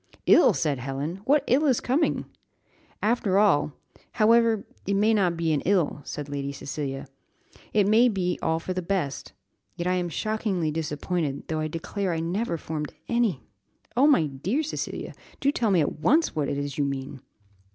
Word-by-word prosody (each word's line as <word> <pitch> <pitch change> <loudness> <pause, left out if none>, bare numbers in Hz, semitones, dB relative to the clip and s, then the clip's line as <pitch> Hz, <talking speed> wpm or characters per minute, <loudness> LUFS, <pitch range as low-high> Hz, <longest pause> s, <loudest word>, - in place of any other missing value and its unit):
"Ill!" - - +7
said 145 -4 -1
Helen; 135 +7 -4
"what 285 +2 +4
ill 285 +5 +3
is 260 -4 +3
coming?" 285 +6 0 0.8
"After 210 -4 +2
all, 195 -8 +3 0.4
however, 230 -1 +4 0.2
it 200 - +1
may 215 +3 +3
not 180 -5 +2
be 165 -1 +1
an 145 - 0
ill," 175 -6 +1
said 145 -1 -5
Lady 140 -1 -3
Cecilia; 135 0 -5 0.7
"it 205 -2 +3
may 230 +4 +5
be 180 -4 -1
all 160 0 +1
for 185 +2 -4
the 185 - -2
best; 170 -6 -3 0.4
yet 170 - -4
I 180 - +2
am 180 -1 -1
shockingly 190 - -1
disappointed, 150 -1 -3
though 160 -1 -1
I 155 - -1
declare 175 +4 -3
I 165 - -1
never 170 +3 -1
formed 150 -1 -5
any 235 - +1 0.3
" - - -37
"Oh, 265 +4 +5
my 275 - +5
dear 160 - -2
Cecilia, 310 - -4 0.3
do 280 - +2
tell 235 -6 0
me 185 -4 +4
at 150 - -2
once 320 - +3
what 150 -3 0
it 140 - -2
is 145 0 -4
you - - +3
mean." 135 -1 -4
175 Hz, 180 wpm, -26 LUFS, 150-215 Hz, 0.8 s, Ill